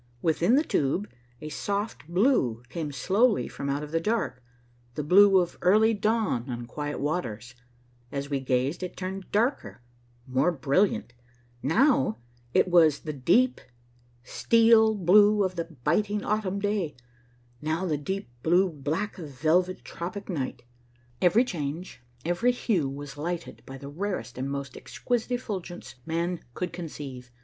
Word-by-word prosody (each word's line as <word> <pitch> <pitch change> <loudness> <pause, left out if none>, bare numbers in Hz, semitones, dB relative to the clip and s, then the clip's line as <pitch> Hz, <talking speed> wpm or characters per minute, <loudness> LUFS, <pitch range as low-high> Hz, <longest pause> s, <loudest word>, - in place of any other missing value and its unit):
Within 170 +7 +3
the 295 - +4
tube 175 - 0 0.3
a 155 - -6
soft 200 +2 -3
blue 170 - +2
came 155 0 -4
slowly 200 - +2
from 140 - -5
out 145 +2 -2
the 165 - +1
dark, 215 - -1 0.5
the 150 - -2
blue 195 +5 +6
of 175 -2 0
early 215 +5 +5
dawn 210 - 0
on 120 -1 -4
quiet 145 +4 -5
waters, 120 -7 -3 0.6
as 140 0 -3
we 140 -1 -1
gazed 130 +5 0
it 180 - -6
turned 190 +1 -5
darker, 205 - 0 0.4
more 130 +6 +2
brilliant; 145 -1 +1 0.5
now 160 - +3 0.3
it - - +3
was 165 -5 +4
the 155 - -5
deep, 200 - +2 0.6
steel 225 - +4
blue 205 +2 +5
of 185 -1 -1
the 170 -1 -2
biting 200 - -1
autumn 210 -2 -1
day, 200 -6 -1 0.7
now 160 +4 -1
the 160 -4 0
deep, 190 +7 -4
blue 180 +5 +3
black 155 +8 -3
of 160 -4 -7
velvet 165 +7 +1
tropic 180 +4 -6
night. 140 -10 -3 0.6
Every 210 +8 +5
change, 160 - -5 0.2
every 175 +9 +2
hue 190 - 0
was 140 +1 -8
lighted 170 +2 -4
by 135 - -8
the 140 - -9
rarest 155 -5 -4
and 135 +2 -2
most 140 -1 -5
exquisite 245 0 -3
effulgence 190 -8 -5
man 170 +2 -1 0.2
could 180 -1 -3
conceive. 140 -7 -7
170 Hz, 140 wpm, -27 LUFS, 140-205 Hz, 0.7 s, blue